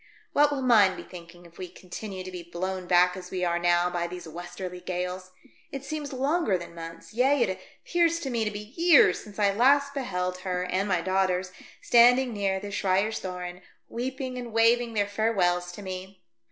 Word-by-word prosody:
What 295 0 +5
will 280 -2 -2
mine 215 -7 +5
be - - -8
thinking 175 0 -13
if 170 0 -17
we 185 - -5
continue 185 +2 -8
to 185 - -8
be 180 -1 -6
blown 180 +2 -5
back 180 0 +4
as 180 -1 -9
we 180 -1 -2
are 170 0 0
now 175 0 +3
by 175 -1 -2
these 175 -1 -8
westerly 175 +2 -7
gales? 180 +1 -4 0.4
It 275 0 -6
seems 295 0 -5
longer 270 - +1
than 170 -1 -10
months, 165 0 -10
yea, 260 +3 +3
it 190 -4 -2 0.3
appears 335 -1 +2
to 270 - -4
me 230 -2 0
to 215 - 0
be 210 +2 -9
years, 330 - +5
since 210 -2 -13
I 200 -2 +3
last 280 +5 +3
beheld 185 -9 -3
her 180 -1 -2
and 190 +2 -1
my 180 -3 +1
daughters 185 0 0 0.3
standing 245 +1 +5
near 195 -2 -1
the 205 +1 -7
Schreyerstoren, 185 -2 -2 0.3
weeping 255 +1 -4
and 240 -1 -7
waving 230 +1 +3
their 205 -1 +2
farewells 190 -4 0
to 205 - -9
me. 190 0 -8
190 Hz, 190 wpm, -27 LUFS, 180-240 Hz, 0.4 s, What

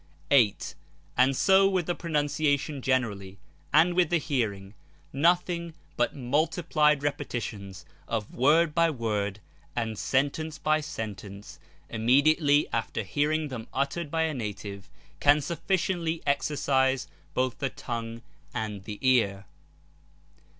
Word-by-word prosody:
8. 115 -8 +3 0.4
And 130 +2 +4
so 195 0 +5
with 185 -3 0
the 175 - 0
pronunciation 145 -3 0
generally, 105 -8 -1 0.3
and 165 +4 +5
with 175 -2 +3
the 175 - +3
hearing, 110 -10 -2 0.4
nothing 170 +2 +1 0.2
but 120 - 0
multiplied 150 +2 +1
repetitions 105 -9 -4 0.2
of 110 -3 -3
word 155 +5 +3
by 170 0 +3
word 105 -6 -2 0.3
and 110 -3 -2
sentence 145 +4 0
by 155 0 +1
sentence, 105 -7 -7 0.3
immediately 145 +6 +3
after 115 -1 -2
hear 145 +10 0
ing 155 -1 -1
them 120 -4 -6
uttered 140 +4 -1
by 160 +2 0
a 160 -1 0
native, 105 -5 -6 0.3
can 145 +1 +5
sufficiently 170 +1 -1
exercise 135 -1 +1 0.3
both 130 -1 0
the 135 - -1
tongue 115 -1 -6 0.3
and 105 -3 -4
the 105 -2 -6
ear. 100 -6 +2
140 Hz, 120 wpm, -27 LUFS, 110-155 Hz, 0.4 s, so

